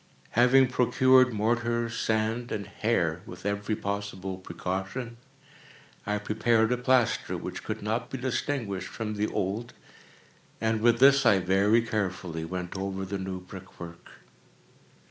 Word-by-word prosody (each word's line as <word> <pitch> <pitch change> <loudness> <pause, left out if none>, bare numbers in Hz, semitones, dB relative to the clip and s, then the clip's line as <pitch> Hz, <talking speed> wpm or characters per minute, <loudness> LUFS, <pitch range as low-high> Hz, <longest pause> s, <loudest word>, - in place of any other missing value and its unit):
Having 125 +2 +5
procured 130 +1 +4
mortar, 120 +2 0
sand, 115 +1 -1
and 100 -2 -3
hair, 90 -5 0
with 90 +1 -10
every 100 +1 -1
possible 100 -2 -4
precaution, 95 +7 -5 0.9
I 105 0 +1
prepared 110 +2 +1
a 125 - +2
plaster 125 -1 +1
which - - -6
could - - -5
not 115 +3 -2
be 135 - -4
distinguished 125 - -2
from 110 -2 -4
the 105 0 -1
old, 105 +5 -3 0.9
and 110 -1 0
with 120 +1 +4
this 135 +2 +6
I 110 -5 +5
very 100 +5 +3
carefully 95 -7 -3
went 90 +1 -5
over 95 0 -3
the 100 +1 -4
new 95 -1 -5
brickwork. 90 -2 -11
105 Hz, 130 wpm, -28 LUFS, 95-120 Hz, 0.9 s, this